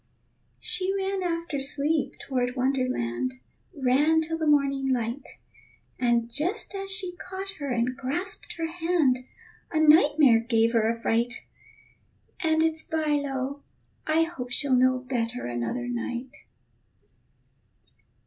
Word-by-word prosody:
She 370 +1 -1
ran 390 0 -1
after 335 -4 -2
Sleep 285 +2 +1
toward 250 -2 -2
Wonderland, 250 - -1 0.4
Ran 290 +4 +3
till 320 +1 -1
the 320 -1 -2
morning 275 -2 +2
light; 240 +2 -3 0.6
And 235 -2 +2
just 335 - 0
as 390 0 -4
she 375 -2 -3
caught 380 +2 -5
her 285 -1 -4
and 245 +1 0
grasped 285 +9 -2
her 330 - -3
hand, 325 -6 +1 0.5
A 315 - +1
nightmare 295 -5 +6
gave 230 0 +1
her 225 -1 +3
a 230 0 -2
fright. 235 +2 0 0.9
And 320 -2 +2
it's 320 0 +2
by 315 -2 -1
lo, 275 +1 -3 0.5
I 315 +1 +3
hope 300 -7 -5
she'll 270 +2 +1
know 255 +1 +4
Better 250 -2 -3
another 120 - -3
night. 245 +2 -4
275 Hz, 125 wpm, -26 LUFS, 245-320 Hz, 0.9 s, nightmare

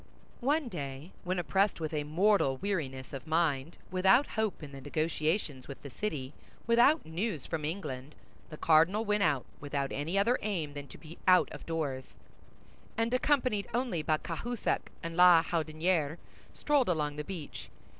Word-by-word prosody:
One 290 +3 +1
day 145 - -6
when 180 +1 -1
oppressed 180 +5 +1
with 160 -1 -3
a 150 -1 0
mortal 160 -3 +2
weariness 135 -9 -3
of 135 +3 -7
mind, 160 -2 0
without 190 +9 +5
hope 220 -7 -2
in 145 - -8
the 135 -1 -9
negotiations 155 -1 -1
with 140 - -8
the 140 - -8
city, 145 -7 -4 0.3
without 240 +7 +4
news 165 - -3
from 160 -2 -3
England, 150 -4 -5 0.3
the 155 - -8
cardinal 165 +9 +4
went 210 0 +1
out, 145 -7 +2
without 140 -1 -2
any 160 +7 -2
other 230 +6 +3
aim 170 -9 -2
than 145 -1 -7
to - - -12
be 160 0 -12
out 185 -1 +5
of - - -10
doors, 145 -6 -2 0.9
and 230 +1 0
accompanied 255 -6 +1
only 240 -10 0
by 155 0 +1
Cahusac 230 +9 -3
and 165 0 -4
La 175 -2 +7
Houdinière, 160 -1 0 0.3
strolled 290 -7 +1
along 150 -4 0
the 150 - -3
beach. 165 -4 -7
165 Hz, 160 wpm, -31 LUFS, 145-200 Hz, 0.9 s, La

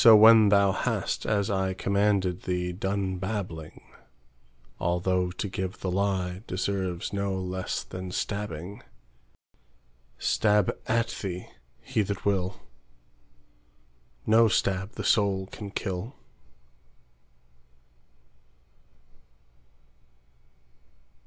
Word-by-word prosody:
So 115 -1 +10
when 110 0 +8
thou 100 -1 +5
hast, - - -1
as 100 -2 +1
ICommanded 95 0 +1
thee, 90 -1 -1
done 95 0 -2
blabbing,—Although 85 - -4
to 90 +3 -4
give 95 -1 -4
the 95 - -1
lieDeserves 95 -1 -2
no 100 -1 -1
less 95 0 -3
than 95 0 -7
stabbing,—Stab 80 - -3
at 115 0 +1
thee 90 -2 -5 0.3
he 110 - 0
that 100 -1 -3
will, 95 -2 0 1.6
No 115 +1 +6
stab 100 -1 0
the - - -5
soul 100 -3 +2
can 105 -2 -7
kill. 100 +5 -4
95 Hz, 80 wpm, -27 LUFS, 90-100 Hz, 1.6 s, So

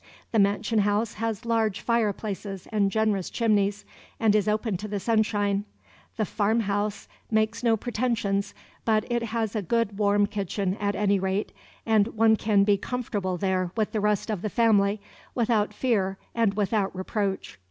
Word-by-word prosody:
The 225 - +2
mansion 205 +2 +2
house 205 +2 +1
has 225 -1 -3
large 225 -3 +1
fireplaces 205 -4 -2
and 205 -2 +2
generous 210 -3 0
chimneys, 205 -3 +1 0.3
and 220 -2 +3
is 210 -1 +2
open 215 0 0
to 210 +4 -6
the 205 -1 -3
sunshine. 205 -2 +1 0.5
The 215 - +1
farm 220 +3 +1
house 205 0 -2 0.2
makes 220 +1 +1
no 230 -2 +3
pretensions, 215 -4 -1 0.3
but 215 -2 +2
it 240 0 +1
has 225 -1 -2
a 215 - 0
good 210 +1 -1
warm 205 0 +3
kitchen, 195 -1 -2
at 205 0 -1
any 200 -1 +2
rate, 190 +2 -1 0.3
and 220 -2 +3
one 220 0 +5
can 210 -2 +2
be 200 0 +3
comfortable 205 -5 -3
there 185 -1 0
with 215 -2 0
the 215 - -1
rest 210 +1 0
of 205 -5 -3
the 215 - -2
family, 205 -3 +3 0.3
without 220 -3 +1
fear 205 -5 0 0.2
and 225 -4 +1
without 205 -1 0
reproach. 190 - -3
210 Hz, 165 wpm, -26 LUFS, 200-225 Hz, 0.5 s, one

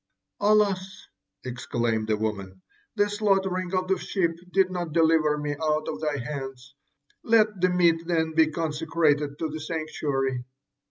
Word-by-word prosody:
'Alas!' 200 -2 +1 0.4
exclaimed 120 -3 -2
the 110 -1 +1
woman, 95 -3 -4 0.3
'The 205 -1 +3
slaughtering 195 -3 0
of 185 0 0
the 190 -1 +1
sheep 180 -4 0 0.2
did 190 0 +3
not 175 -4 -4
deliver 160 -2 +3
me 150 0 -3
out 155 -1 0
of - - -4
thy 150 -2 -1
hands! 135 -1 -6 0.5
Let 215 -4 +3
the 185 - +4
meat 170 -2 +2
then 160 -2 0
be 160 0 +5
consecrated 155 -2 0
to 160 - -2
the 155 +1 -6
sanctuary.' 145 -5 -2
160 Hz, 145 wpm, -26 LUFS, 145-185 Hz, 0.5 s, be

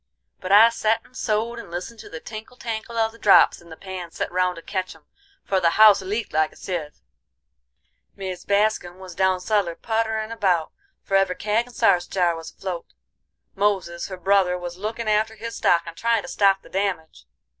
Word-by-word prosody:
But 185 - -5
I 215 +3 +8
set 225 -1 0
and 255 - -22
sewed 230 0 -1
and 235 - -10
listened 180 +7 -6
to - - -11
the 160 - -7
tinkle 220 +6 -10
tankle 230 0 -5
of 225 -1 +2
the 230 - -17
drops 200 - +5
in 170 - -17
the 160 - -10
pans 185 -3 -8
set - - -3
round 180 0 +1
to 165 - -11
ketch 185 -2 -4
'em, - - -21 0.4
for 195 - +1
the 170 -2 +3
house 215 -2 +8
leaked 210 +4 -3
like 155 0 +2
a - - -19
sieve. 165 -6 -5 1.1
Mis 185 -2 -6
Bascurn 200 -3 0
was 185 -1 -10
down 190 +1 +2
suller 190 -3 0
putterin' 220 0 -2
about, 185 -8 0 0.3
for 195 - -1
every 195 -1 +3
kag 215 +5 0
and 245 - -15
sarce 175 -1 +3
jar 175 -3 +1
was 165 0 -8
afloat. 180 -3 -6 0.7
Moses, 195 -4 -1
her 185 - -7
brother, 185 -1 +2
was 175 -1 -6
lookin' 215 +4 -4
after 215 +1 +1
his 230 +2 -6
stock 170 -1 +3
and 170 -1 -8
tryin' 230 +2 +1
to - - -9
stop 195 -1 +2
the - - -16
damage. 190 -5 -3
195 Hz, 200 wpm, -23 LUFS, 180-220 Hz, 1.1 s, I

